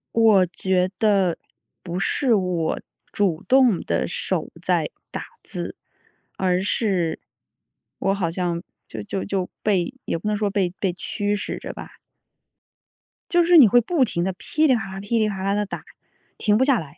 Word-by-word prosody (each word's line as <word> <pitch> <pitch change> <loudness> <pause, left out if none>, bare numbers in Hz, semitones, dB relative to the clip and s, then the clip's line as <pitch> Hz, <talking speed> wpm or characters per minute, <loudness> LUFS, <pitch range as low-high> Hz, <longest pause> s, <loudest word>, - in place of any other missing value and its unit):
我 220 -5 +6
觉 185 +1 0
得 195 -5 +3 0.4
不 175 -1 -5
是 245 +6 +1
我 180 -5 0 0.3
主 185 -6 0
动 255 -6 +5
地 - - -1
手 - - -2
在 - - +1 0.2
打 - - -5 0.2
字， - - -5 0.6
而 185 -1 +1
是， 190 -4 0 0.8
我 195 - +1
好 190 -4 -1
像 170 0 -2 0.3
就 110 - -6
就 145 - -4
就 190 -2 -2
被 195 +1 +1
也 - - -2
不 170 - -6
能 210 - +1
说 205 0 0
被 195 -3 +1
被 190 - +1
驱 205 +3 -2
使 205 - -3
着 - - -6
吧。 - - -9 1.4
就 345 - +5
是 350 +1 +5
你 280 - +10
会 245 +4 +5
不 305 +3 +1
停 170 -6 -2
地 190 - -1
噼 310 +11 0
里 260 - +5
啪 220 -4 -4
啦， 190 - -6
噼 205 +4 -1
里 215 -1 +2
啪 195 -2 -5
啦 195 +1 +1
地 210 0 0
打， - - -6 0.6
停 210 -1 +3
不 260 - +3
下 270 -5 +3
来。 145 -2 -12
195 Hz, 185 characters per minute, -23 LUFS, 180-220 Hz, 1.4 s, 你